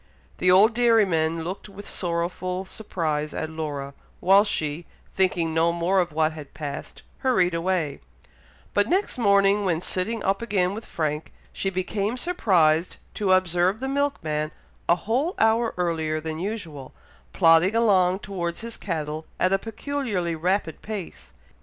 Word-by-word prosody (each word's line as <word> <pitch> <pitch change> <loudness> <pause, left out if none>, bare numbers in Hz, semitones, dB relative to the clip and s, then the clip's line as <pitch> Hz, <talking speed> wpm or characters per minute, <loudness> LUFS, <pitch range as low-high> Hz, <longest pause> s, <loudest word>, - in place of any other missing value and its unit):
The 185 - +3
old 200 +5 +6
dairyman 190 -9 +2
looked 185 +5 -6
with 200 +1 -10
sorrowful 180 +2 -2
surprise 155 -7 -3
at 160 - -3
Laura, 145 -3 -4 0.3
while 195 +2 +6
she, 160 -5 -3 0.3
thinking 175 -4 +1
no 165 +1 +3
more 170 +3 +1
of 175 -1 0
what 155 +1 +1
had 150 -3 -11
passed, 145 -1 -6 0.2
hurried 185 -10 +2
away; 165 -3 -1 0.7
but 205 +1 +2
next 375 -7 0
morning, 200 -1 +4
when 175 -4 +1
sitting 195 +5 -2
up 195 +2 +1
again 195 -5 +1
with 220 +2 -7
Frank, 155 -1 -3 0.2
she 195 - -1
became 200 +5 -2
surprised 180 - +2 0.2
to 205 -3 0
observe 185 +2 +2
the 265 - -3
milkman 160 - -1 0.4
a 170 - +6
whole 250 - -1
hour 225 +1 +3
earlier 160 -3 0
than 160 0 -5
usual, 170 -9 -5 0.4
plodding 165 - +5
along 190 -5 +4
towards 175 -4 -4
his 230 0 -7
cattle 155 -4 -4
at 185 +1 +2
a 195 - +3
peculiarly 225 -6 -3
rapid 170 0 -1
pace. 195 - -7
185 Hz, 145 wpm, -25 LUFS, 160-205 Hz, 0.7 s, old